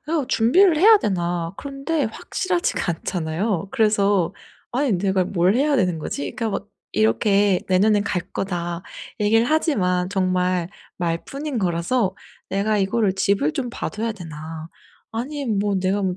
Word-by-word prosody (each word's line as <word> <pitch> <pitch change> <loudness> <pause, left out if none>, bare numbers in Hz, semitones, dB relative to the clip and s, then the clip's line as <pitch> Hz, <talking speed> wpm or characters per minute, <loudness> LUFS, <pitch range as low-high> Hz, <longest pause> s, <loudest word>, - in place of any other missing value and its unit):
'이거 310 -4 0
준비를 320 - +4
해야 425 +7 +7
되나.' 175 - -1
그런데 280 +2 -2
확실하지가 345 - -1
않잖아요. 180 +3 -2
그래서 205 -6 +2 0.4
아니 260 0 +1
'내가 190 0 +1
뭘 180 +1 +2
해야 285 +3 +2
되는 180 -7 +1
거지?' 145 -2 -4
그러니까 225 -2 -2
막 200 0 -4 0.2
이렇게 205 -3 +3
"내년에는 205 +2 +3
갈 180 -3 -1
거다." 175 -2 -3 0.4
얘기를 225 +3 +3
하지만 185 - +1
정말 185 -2 0 0.3
말뿐인 240 - -3
거라서 185 +3 0 0.4
'내가 205 +2 +1
이거를 195 +1 +1
집을 195 -6 +1
좀 250 -3 -3
봐 - - -4
둬야 225 +1 -3
되나?' 160 -3 -8 0.4
아니면 250 -2 -2
'뭐 205 0 +1
내가 190 +2 0
200 Hz, 310 characters per minute, -22 LUFS, 180-235 Hz, 0.4 s, 해야